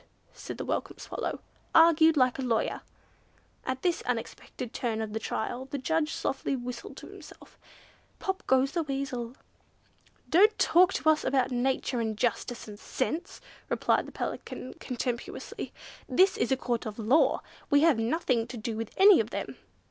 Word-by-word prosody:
said - - -8
the - - -4
Welcome - - -2
Swallow, - - -4 0.3
"argued 325 -1 +6
like 255 -1 +3
a - - 0
lawyer." 235 -4 0 0.8
At 260 0 -3
this 350 -2 +1
unexpected 240 0 -5
turn 230 -3 -2
of 220 -1 -4
the 220 - -1
trial 245 +4 -3
the 275 +1 -5
Judge 315 +3 0
softly 270 0 -2
whistled 245 -2 -7
to - - -9
himself, - - -14 0.6
"Pop 385 0 -3
goes 265 +1 +3
the 335 - 0
weasel." 270 -4 -3 0.9
"Don't 420 +6 +5
talk 365 +2 +5
to - - -2
us 315 -1 +4
about 260 -1 +1
nature 250 0 0
and 220 -2 -2
justice 245 +1 -2
and 205 -1 -10
sense," 320 +7 -3 0.3
replied - - +1
the - - -9
Pelican, 255 - -5
contemptuously. 245 -1 -4 0.4
"This 380 +1 +4
is 245 - -1
a 265 - +3
Court 240 -3 -2
of 210 - -6
law, 260 +6 +3 0.3
we 285 0 +5
have 315 -7 +4
nothing 235 -1 0
to 250 - -7
do 225 0 -4
with 225 0 -4
any 390 0 +8
of - - 0
them!" - - -5
260 Hz, 165 wpm, -29 LUFS, 235-315 Hz, 0.9 s, any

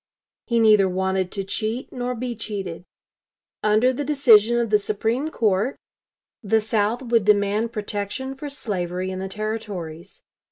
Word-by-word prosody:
He 235 -2 +2
neither 210 -4 +5
wanted 190 0 -1
to 195 - -2
cheat 220 +5 -3
nor 250 0 -3
be 245 0 -4
cheated. 195 -6 -5 0.8
Under 215 +5 +3
the 290 - -3
decision 240 -6 +5
of 235 -2 0
the 210 - +5
Supreme 225 +8 -1
Court 215 -1 0 0.6
the 220 0 +2
South 220 +2 0
would 230 -3 +2
demand 210 +2 +2
protection 210 +4 -4
for 285 +2 -7
slavery 185 -8 -3
in 185 - -5
the 190 0 -4
Territories. 200 -5 -6
215 Hz, 145 wpm, -23 LUFS, 195-240 Hz, 0.8 s, neither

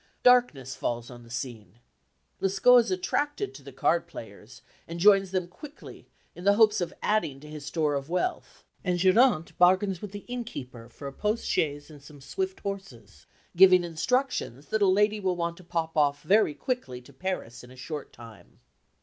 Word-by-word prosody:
Darkness 200 - +3
falls 120 +1 -3
on 120 -1 -11
the 115 - -16
scene. 115 -5 -6 0.6
Lescaut 195 +6 +5
is 235 - 0
attracted 290 - -1
to - - -12
the 140 0 -11
card 170 +6 +1
players, 110 -7 -12 0.2
and 170 +1 -6
joins 195 0 +5
them 185 -2 -2
quickly 295 - -12 0.3
in 175 - -11
the 200 +1 +4
hopes 215 -2 +4
of 175 - -2
adding 205 -11 0
to 150 - -13
his 150 -1 -9
store 150 -1 0
of 140 +1 -3
wealth, 180 - -3 0.2
and 180 -2 0
Geronte 185 -1 +3
bargains 185 +1 +3
with 210 - -7
the 205 0 -9
innkeeper 135 - -7
for 140 - -9
a 140 - -7
post 210 +8 -2
chaise 145 0 -1
and 145 -2 -13
some 145 0 -14
swift 380 - -4
horses, 195 - -8 0.3
giving 185 0 +7
instructions 170 - -2
that 220 -1 0
a 200 - +5
lady 210 +3 +3
will 185 -2 0
want 170 -1 -2
to 185 - -14
pop 165 -2 -3
off 145 -2 +2
very 200 -6 +3
quickly 245 - -4
to 135 +3 -17
Paris 130 -7 -5
in 125 - -13
a 130 - -14
short 145 +3 -7
time. 115 -6 -15
175 Hz, 185 wpm, -27 LUFS, 140-205 Hz, 0.6 s, giving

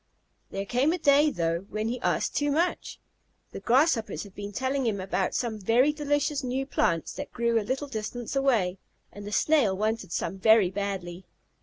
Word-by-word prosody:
There 195 0 -4
came 250 +8 +2
a - - -1
day, 295 -1 +4
though, 170 - -2
when 215 +1 -2
he 245 +2 -3
asked - - 0
too 290 0 +1
much. 330 +5 -1 0.5
The - - -7
Grasshoppers 255 -2 +2
had 200 -3 -13
been 205 +1 -7
telling 260 +3 -1
him 205 -3 -1
about 190 0 -1
some 225 -3 -2
very 240 +9 +3
delicious 290 -1 -1
new 260 +2 -2
plants 170 - 0
that 285 - -7
grew 235 -1 +1
a - - -2
little 260 +7 -3
distance 240 0 -5
away, 225 -10 +1 0.3
and 205 0 -9
the - - -6
Snail 235 -7 +2
wanted 215 -2 -2
some 190 - -3
very 220 -3 +5
badly. 190 -2 -4
230 Hz, 180 wpm, -27 LUFS, 200-275 Hz, 0.5 s, very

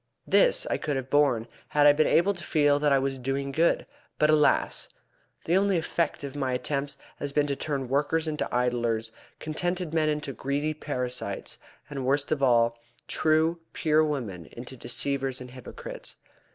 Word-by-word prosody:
This - - +4
I - - 0
could 150 -2 -2
have 130 -1 -4
borne 140 -6 +3 0.2
had 145 -1 +3
I 145 - +8
been 155 +1 +3
able 190 +5 +4
to 175 -3 -5
feel 145 -2 +3
that 145 0 +2
I 140 - +5
was 135 0 -1
doing 135 +2 -2
good, 165 +5 +2 0.3
but, 150 0 +4
alas! 150 -1 +2 0.6
the 170 - +2
only 195 -1 +3
effect 165 -2 -1
of 140 0 -6
my 135 -3 -1
attempts 140 +2 -2 0.2
has 145 - -3
been 145 +1 +2
to 140 -1 -1
turn 140 -2 -3
workers 150 +5 +1
into 150 -1 -2
idlers, 120 -2 0 0.3
contented 175 +2 -2
men 155 -1 +2
into 150 -2 -2
greedy 145 +4 -1
parasites, 125 -8 -4 0.3
and, 140 -3 -5
worst 140 +2 +1
of 155 -3 0
all, 115 -3 +3 0.3
true, 160 +2 +2
pure 155 -1 +3
women 120 - -3
into 125 +2 -9
deceivers 135 +2 -1
and 125 -1 -9
hypocrites. 130 -1 -9
145 Hz, 170 wpm, -27 LUFS, 130-155 Hz, 0.6 s, I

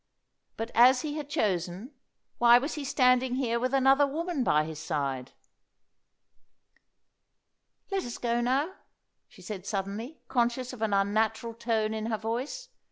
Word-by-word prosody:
But, 225 +1 -4
as 250 +2 +6
he 300 0 -3
had 295 -2 -6
chosen, 195 - -1 0.5
why 240 0 +7
was 280 +5 -2
he 295 - -5
standing 255 -2 +3
here 235 -3 0
with 255 +1 -1
another 270 +1 +4
woman 320 0 -2
by 150 -8 +3
his 155 -1 -7
side? 140 -5 -3 2.6
"Let 390 -1 0
us 240 - -6
go 235 0 0
now," 275 +9 0 0.6
she - - -16
said 200 -3 -7
suddenly, 210 +8 -4
conscious 250 0 0
of 240 - -10
an 220 -2 0
unnatural 220 +3 +1
tone 225 -2 -1
in 220 0 -3
her 225 -1 -1
voice. 250 - -4
235 Hz, 145 wpm, -28 LUFS, 215-270 Hz, 2.6 s, why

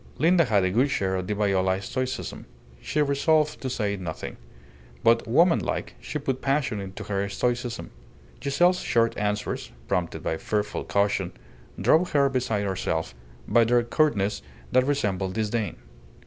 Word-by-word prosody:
Linda 170 +1 +4
had 100 -6 +3
a 95 - +1
good 125 +8 +3
share 95 -7 0
of 90 -1 -3
the 105 - -1
Viola 95 -2 +1
stoicism. 130 +6 -4 0.3
She 150 - +1
resolved 150 +2 +2
to 130 - -2
say 105 -5 -1
nothing. 85 -4 -6 0.7
But 115 0 +4
woman 165 +9 +4
like - - -3
she - - -4
put 135 -3 -2
passion 135 -6 0
into 100 +1 -7
her 100 -1 -2
stoicism. 120 +2 -2 0.5
Giselle's 175 +6 +3
short 115 -1 +1
answers, 105 0 -2 0.2
prompted 85 -2 -1
by 80 - -1
fearful 105 +3 -2
caution, 100 -2 0 0.5
drove 175 +3 +3
her 140 -1 +4
beside 120 -6 -1
herself 90 -4 -2 0.3
by 120 - +5
their 120 +1 +3
curtness 115 -6 +1 0.3
that 130 +1 +3
resembled 100 -10 0
disdain. 110 0 -1
115 Hz, 150 wpm, -26 LUFS, 100-140 Hz, 0.7 s, by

